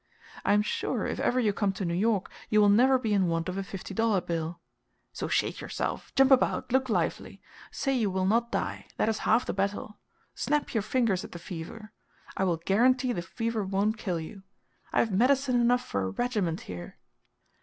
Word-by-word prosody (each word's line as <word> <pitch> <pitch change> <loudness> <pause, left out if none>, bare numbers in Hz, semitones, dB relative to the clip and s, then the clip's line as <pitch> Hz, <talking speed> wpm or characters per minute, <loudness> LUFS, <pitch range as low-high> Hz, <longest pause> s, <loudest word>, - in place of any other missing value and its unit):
I - - +3
am 210 0 +4
sure, - - -2
if - - -3
ever 255 - +1
you 215 -4 +2
come 195 -1 0
to 195 -1 -4
New 170 - -1
York, 200 +2 +1 0.2
you 215 - +4
will 205 -1 +6
never 255 +6 +5
be 225 -4 -1
in 195 -3 +3
want 165 0 -1
of 185 - -3
a 195 - -2
fifty 195 0 -7
dollar 225 -1 +2
bill. 170 -1 -4 0.5
So - - -4
shake - - 0
yourself; - - -4
jump 270 0 +5
about; 255 -1 +3
look 260 0 +2
lively. 220 - -1 0.3
Say 275 - -1
you 230 -6 +1
will 190 0 0
not 235 +4 +2
die; - - -3
that - - +2
is 220 - -1
half 230 +3 +4
the - - -2
battle. 200 +2 -3 0.3
Snap 295 0 -1
your 225 - +1
fingers 215 -4 +1
at - - -10
the - - -6
fever. 180 +5 -8 0.4
I 190 - +1
will 175 -3 +1
guarantee 245 +8 +2
the 175 - -2
fever 225 +4 -3
won't 200 +3 0
kill 180 -6 -2
you. 175 +5 -8 0.5
I - - -2
have 225 - -1
medicine 255 +4 +3
enough 245 +1 +2
for 100 - -2
a 95 - -1
regiment 205 - -1
here!" 90 -1 -8
210 Hz, 205 wpm, -28 LUFS, 185-240 Hz, 0.5 s, will